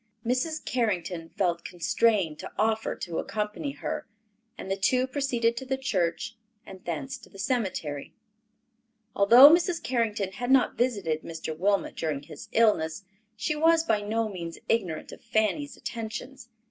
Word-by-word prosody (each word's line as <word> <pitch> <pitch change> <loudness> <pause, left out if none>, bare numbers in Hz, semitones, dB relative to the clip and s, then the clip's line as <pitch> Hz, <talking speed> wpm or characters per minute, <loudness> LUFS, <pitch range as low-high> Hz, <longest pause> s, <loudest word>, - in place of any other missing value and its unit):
Mrs. 265 +6 -1
Carrington 180 -8 -1
felt 175 -4 -1
constrained 180 -1 +1
to - - -7
offer 220 +1 +1
to 170 -3 -4
accompany 215 +7 -3
her, - - -4 0.5
and 190 - -6
the - - +2
two 250 +6 +2
proceeded 260 -4 0
to 265 - -3
the 265 0 0
church 215 -2 -1 0.3
and 190 -1 -11
thence 260 - -4
to 220 - -16
the 195 - -15
cemetery. 190 - -2 1.0
Although 240 +8 +9
Mrs. 340 0 +2
Carrington 220 -6 0
had 245 +6 -4
not 265 -1 +4
visited 200 -11 0
Mr. 160 -1 -6
Wilmot 195 +4 +1
during 150 -3 -2
his 160 - -11
illness, 205 -6 +2 0.3
she 305 +8 -1
was 325 +1 +4
by 220 -10 +1
no 220 +2 0
means 170 -5 -6
ignorant 185 -9 -1
of - - -11
Fanny's 230 +6 0
attentions. 235 +2 -6
220 Hz, 145 wpm, -27 LUFS, 180-255 Hz, 1.0 s, Although